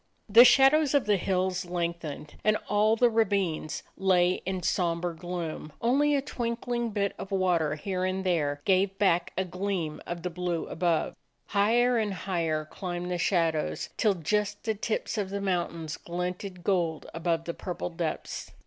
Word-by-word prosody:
The 230 Hz, +3 st, +9 dB
shadows 280 Hz, +3 st, +5 dB
of 280 Hz, -, +3 dB
the 205 Hz, -1 st, +3 dB
hills 185 Hz, 0 st, 0 dB
lengthened, 170 Hz, -4 st, -4 dB
and 215 Hz, +1 st, +3 dB
all 215 Hz, +2 st, +3 dB
the 245 Hz, +2 st, +4 dB
ravines 200 Hz, -9 st, 0 dB
lay 180 Hz, -1 st, +2 dB
in 185 Hz, -2 st, -2 dB
somber 170 Hz, -1 st, 0 dB
gloom; 165 Hz, -3 st, -5 dB
only 285 Hz, +5 st, +3 dB
a 275 Hz, -, 0 dB
twink 235 Hz, -4 st, -3 dB
ling 240 Hz, -1 st, -1 dB
bit 200 Hz, -2 st, -1 dB
of 195 Hz, -, -6 dB
water 175 Hz, -6 st, +1 dB
here 185 Hz, +4 st, -3 dB
and 185 Hz, +1 st, -1 dB
there 150 Hz, -6 st, 0 dB
gave 195 Hz, 0 st, +2 dB
back 175 Hz, -4 st, +2 dB
a 190 Hz, -, +1 dB
gleam 180 Hz, -3 st, -3 dB
of 175 Hz, -1 st, -5 dB
the 180 Hz, -, -2 dB
blue 175 Hz, -1 st, -2 dB
above. 170 Hz, -1 st, 0 dB, 0.3 s
Higher 235 Hz, +4 st, +3 dB
and 210 Hz, -3 st, -1 dB
higher 165 Hz, -5 st, -1 dB
climbed 175 Hz, +2 st, -5 dB
the 175 Hz, -, -1 dB
shadows 165 Hz, -4 st, 0 dB
till 210 Hz, -3 st, +2 dB
just 205 Hz, +5 st, -1 dB
the 220 Hz, -, 0 dB
tips 215 Hz, +1 st, -2 dB
of 195 Hz, -2 st, -2 dB
the 200 Hz, +1 st, -3 dB
mountains 170 Hz, -5 st, -2 dB
glinted 180 Hz, +1 st, -5 dB
gold 170 Hz, -5 st, 0 dB
above 165 Hz, 0 st, -1 dB
the 170 Hz, -, -3 dB
purple 180 Hz, 0 st, -5 dB
depths. 165 Hz, -1 st, -4 dB
185 Hz, 165 wpm, -28 LUFS, 170-205 Hz, 0.3 s, The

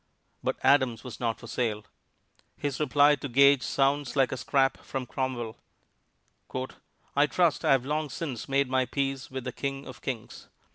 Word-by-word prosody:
But -, -, -1 dB
Adams 130 Hz, -5 st, +3 dB
was 125 Hz, -, -8 dB
not 115 Hz, -2 st, -1 dB
for -, -, -11 dB
sale. 110 Hz, -3 st, -2 dB, 0.7 s
His 145 Hz, -2 st, -3 dB
reply 145 Hz, 0 st, +5 dB
to 140 Hz, -, -6 dB
Gage 140 Hz, +2 st, +6 dB
sounds 140 Hz, +2 st, +1 dB
like 135 Hz, -3 st, +3 dB
a 130 Hz, -, -2 dB
scrap 135 Hz, +1 st, +2 dB
from 135 Hz, -2 st, -5 dB
Cromwell: 120 Hz, -3 st, -3 dB, 1.6 s
"I 145 Hz, +1 st, +5 dB
trust 170 Hz, -1 st, +2 dB
I -, -, +5 dB
have 130 Hz, -2 st, +2 dB
long 150 Hz, +1 st, -1 dB
since 135 Hz, -3 st, -5 dB
made 140 Hz, 0 st, +2 dB
my 130 Hz, 0 st, +1 dB
peace 135 Hz, -1 st, -2 dB
with 130 Hz, -1 st, -5 dB
the 125 Hz, -, -4 dB
King 135 Hz, +2 st, -4 dB
of -, -, -10 dB
Kings. 120 Hz, -5 st, -6 dB
135 Hz, 170 wpm, -28 LUFS, 125-140 Hz, 1.6 s, Gage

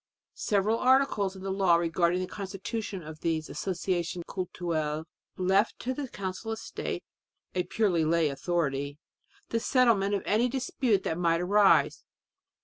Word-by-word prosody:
Several 210 Hz, +2 st, +2 dB
articles 255 Hz, -7 st, +3 dB
in 190 Hz, -, -10 dB
the 195 Hz, -, -2 dB
law 190 Hz, -3 st, +4 dB
regarding 170 Hz, +1 st, +1 dB
the -, -, -1 dB
constitution 195 Hz, 0 st, -5 dB
of 155 Hz, 0 st, -9 dB
these 160 Hz, -2 st, -1 dB
Associations 175 Hz, -2 st, -2 dB
Cultuelles 160 Hz, -4 st, -2 dB, 0.3 s
left 190 Hz, +4 st, +2 dB
to 255 Hz, -, -3 dB
the 275 Hz, +1 st, -4 dB
Council 195 Hz, +1 st, -5 dB
of -, -, -5 dB
State 225 Hz, -, -5 dB, 0.5 s
a 185 Hz, -, +1 dB
purely 185 Hz, -4 st, +1 dB
lay 165 Hz, 0 st, +3 dB
authority 140 Hz, -2 st, -1 dB, 0.5 s
the 230 Hz, -, 0 dB
settlement 225 Hz, -6 st, +3 dB
of 195 Hz, -, -2 dB
any 230 Hz, +4 st, +2 dB
dispute 250 Hz, -5 st, 0 dB
that 160 Hz, -, -2 dB
might 165 Hz, -1 st, +2 dB
arise. 200 Hz, +2 st, +4 dB
190 Hz, 140 wpm, -29 LUFS, 170-210 Hz, 0.5 s, law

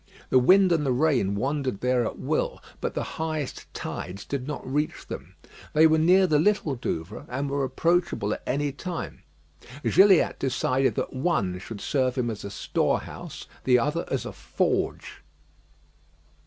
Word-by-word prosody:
The 130 Hz, -, +6 dB
wind 185 Hz, +8 st, +5 dB
and 165 Hz, -3 st, +2 dB
the 135 Hz, -, +1 dB
rain 125 Hz, -7 st, +2 dB
wandered 130 Hz, -1 st, -2 dB
there 125 Hz, -1 st, +2 dB
at -, -, -6 dB
will, -, -, -1 dB, 0.2 s
but -, -, -3 dB
the -, -, -1 dB, 0.2 s
highest 155 Hz, -4 st, -4 dB
tides 90 Hz, +4 st, -6 dB
did 140 Hz, -2 st, -4 dB
not 150 Hz, -, -5 dB
reach 150 Hz, +3 st, -2 dB
them. -, -, -8 dB, 0.4 s
They 155 Hz, +1 st, +6 dB
were 160 Hz, 0 st, +5 dB
near 185 Hz, +4 st, +5 dB
the 155 Hz, -4 st, +3 dB
Little 185 Hz, -4 st, +2 dB
Douvre, 80 Hz, -10 st, -4 dB
and 140 Hz, +3 st, -2 dB
were 140 Hz, 0 st, 0 dB
approachable 165 Hz, -, +1 dB
at -, -, -6 dB
any 145 Hz, +2 st, 0 dB
time. 175 Hz, +5 st, -6 dB, 0.6 s
Gilliatt 195 Hz, -2 st, +5 dB
decided 130 Hz, 0 st, +1 dB
that 130 Hz, -, -2 dB
one 130 Hz, -, 0 dB
should 105 Hz, +2 st, -8 dB
serve 130 Hz, -3 st, 0 dB
him 120 Hz, -3 st, 0 dB
as 105 Hz, -, -7 dB
a 100 Hz, -, -5 dB
storehouse, 100 Hz, -, -2 dB, 0.2 s
the 125 Hz, -1 st, +5 dB
other 150 Hz, +7 st, 0 dB
as 135 Hz, -, -2 dB
a -, -, -6 dB
forge. -, -, -2 dB
140 Hz, 160 wpm, -26 LUFS, 125-160 Hz, 0.6 s, The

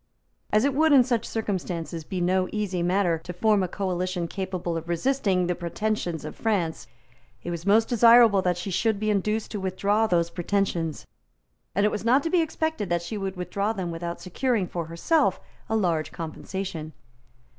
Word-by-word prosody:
As 215 Hz, +4 st, +4 dB
it 280 Hz, -, +2 dB
would, 310 Hz, +2 st, +4 dB
in 265 Hz, -3 st, +8 dB
such 240 Hz, -3 st, -1 dB
circumstances, 175 Hz, -6 st, -3 dB
be 180 Hz, +3 st, -4 dB
no 185 Hz, +1 st, +1 dB
easy 200 Hz, -4 st, -2 dB
matter 175 Hz, -1 st, +1 dB
to 180 Hz, -, -7 dB
form 210 Hz, +3 st, +3 dB
a 185 Hz, -, 0 dB
coalition 180 Hz, -2 st, -2 dB
capable 180 Hz, -2 st, -3 dB
of 165 Hz, +1 st, -5 dB
resisting 190 Hz, -1 st, +1 dB
the 180 Hz, -, 0 dB
pretensions 175 Hz, -2 st, -3 dB
of 155 Hz, -, -7 dB
France, 190 Hz, -8 st, -1 dB, 0.6 s
it 175 Hz, -, -4 dB
was 170 Hz, +2 st, -5 dB
most 220 Hz, +2 st, +4 dB
desirable 230 Hz, -3 st, +6 dB
that 180 Hz, -1 st, 0 dB
she 190 Hz, +2 st, -4 dB
should 220 Hz, +3 st, +1 dB
be 215 Hz, 0 st, +1 dB
induced 210 Hz, +2 st, -1 dB
to 210 Hz, -, -3 dB
withdraw 200 Hz, +3 st, +1 dB
those 170 Hz, -3 st, +1 dB
pretensions; 175 Hz, -3 st, -1 dB, 0.7 s
and 200 Hz, +2 st, +3 dB
it 210 Hz, -, +2 dB
was 210 Hz, -, -3 dB
not 255 Hz, +5 st, +4 dB
to 330 Hz, -, -2 dB
be 355 Hz, -, +4 dB
expected 315 Hz, -, -2 dB
that 175 Hz, 0 st, 0 dB
she 170 Hz, +6 st, -5 dB
would 195 Hz, -2 st, -3 dB
withdraw 200 Hz, +4 st, -2 dB
them 185 Hz, -5 st, -4 dB
without 170 Hz, +1 st, -5 dB
securing 225 Hz, +2 st, 0 dB
for 170 Hz, -1 st, -4 dB
herself 185 Hz, -, +1 dB, 0.3 s
a 220 Hz, -, +1 dB
large 165 Hz, -7 st, 0 dB
compensation. 165 Hz, 0 st, -5 dB
190 Hz, 180 wpm, -26 LUFS, 175-220 Hz, 0.7 s, in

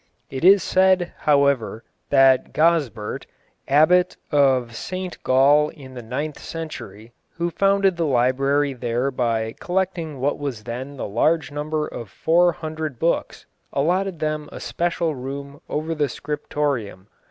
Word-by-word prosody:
It 135 Hz, -, -5 dB
is 195 Hz, +2 st, +7 dB
said, 185 Hz, -2 st, +3 dB
however, 140 Hz, -6 st, +1 dB, 0.3 s
that 135 Hz, -2 st, +4 dB
Gozbert, 150 Hz, -10 st, 0 dB, 0.4 s
abbot 175 Hz, +6 st, +4 dB
of 130 Hz, -5 st, +2 dB
St 185 Hz, +5 st, -5 dB
Gall 145 Hz, +3 st, +4 dB
in 135 Hz, -5 st, -12 dB
the 125 Hz, -, -7 dB
ninth 140 Hz, +6 st, -4 dB
century, 120 Hz, -, -8 dB, 0.2 s
who 170 Hz, +1 st, -1 dB
founded 195 Hz, -1 st, +2 dB
the 165 Hz, -2 st, 0 dB
library 135 Hz, +2 st, +2 dB
there 125 Hz, +2 st, -1 dB
by 115 Hz, -3 st, -1 dB
collecting 175 Hz, -5 st, -2 dB
what 140 Hz, +3 st, 0 dB
was 135 Hz, -7 st, -4 dB
then 130 Hz, +5 st, -6 dB
the -, -, -4 dB
large 145 Hz, +9 st, +1 dB
number 150 Hz, +1 st, -2 dB
of 115 Hz, -4 st, -8 dB
four 175 Hz, -, +3 dB
hundred 155 Hz, -4 st, -5 dB
books, 165 Hz, +5 st, -1 dB, 0.3 s
allotted 180 Hz, +5 st, 0 dB
them 155 Hz, -1 st, -3 dB
a -, -, -8 dB
special 170 Hz, -2 st, -1 dB
room 140 Hz, +2 st, -7 dB
over 155 Hz, +2 st, -2 dB
the 150 Hz, -3 st, 0 dB
scriptorium. 145 Hz, -9 st, -3 dB
145 Hz, 135 wpm, -22 LUFS, 130-165 Hz, 0.4 s, is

